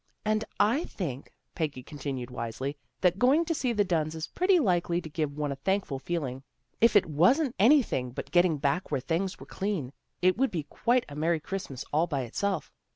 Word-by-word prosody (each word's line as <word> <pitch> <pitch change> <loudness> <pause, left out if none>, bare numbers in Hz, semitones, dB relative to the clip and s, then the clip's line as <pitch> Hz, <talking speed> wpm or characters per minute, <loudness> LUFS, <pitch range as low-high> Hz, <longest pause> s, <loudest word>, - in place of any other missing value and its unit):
" - - -45
And 215 0 +1 0.2
I 235 - +3
think," 145 - -5 0.2
Peggy 145 -6 -3
continued 135 -3 -5
wisely, 125 +4 -4
" - - -48
that 180 +1 +3
going 280 +8 +4
to 330 - 0
see 260 -5 0
the 210 -3 +2
Dunns 160 -4 0
is 160 - -3
pretty 365 +1 +3
likely 175 - +1
to 165 - -8
give 150 -2 -2
one 150 -1 -1
a - - -2
thankful 185 -3 -1
feeling. 135 -5 -3 0.4
If 230 -1 +5
it 205 - +6
wasn't 230 - +3
anything 220 - +4
but 120 - -7
getting 175 -3 +4
back 145 +6 0
where - - 0
things 170 +8 -2
were - - -10
clean, 190 -10 -3 0.3
it 185 +1 +3
would 270 0 +3
be 165 -4 -3
quite 240 - +1
a 145 - -10
merry 160 +2 +1
Christmas 150 -6 -5
all 160 +3 +3
by 145 -5 -1
itself. 165 - -2
170 Hz, 205 wpm, -28 LUFS, 145-205 Hz, 0.4 s, it